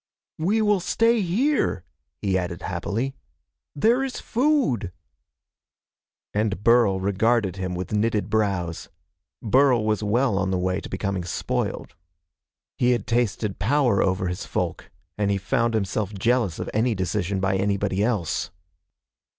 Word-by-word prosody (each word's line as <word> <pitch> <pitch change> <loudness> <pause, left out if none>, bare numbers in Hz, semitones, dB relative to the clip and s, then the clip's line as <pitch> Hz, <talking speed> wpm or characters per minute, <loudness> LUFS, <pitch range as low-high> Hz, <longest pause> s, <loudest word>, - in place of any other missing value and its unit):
"We 205 +7 +2
will 210 -2 +3
stay 230 +5 +2
here," 200 - +1 0.4
he 95 -2 +1
added 90 -1 -2
happily. 105 +9 -2 0.6
"There 235 - +3
is 265 -2 -4
food." 245 - +1 1.4
And 105 -2 -1
Burl 115 -5 +4
regarded 100 0 +1
him 95 -1 -3
with 90 +3 -5
knitted 105 -2 +1
brows. 100 -6 -1 0.5
Burl 125 0 +4
was 110 -1 +1
well 110 0 +1
on 95 0 0
the 95 - 0
way 90 +1 -1
to - - -9
becoming 100 -3 -2
spoiled. 85 - -3 0.9
He 125 0 +4
had 120 -4 -2
tasted 115 -4 -1
power 125 0 +2
over 95 0 +1
his 90 0 -4
folk, - - -3 0.3
and 100 -1 +1
he 100 - +1
found 115 +4 0
himself 105 0 -1
jealous 115 -3 +1
of - - -4
any 115 +1 +1
decision 95 +1 -1
by 95 0 +1
anybody 100 0 0
else. 105 -8 -1
105 Hz, 135 wpm, -24 LUFS, 95-125 Hz, 1.4 s, Burl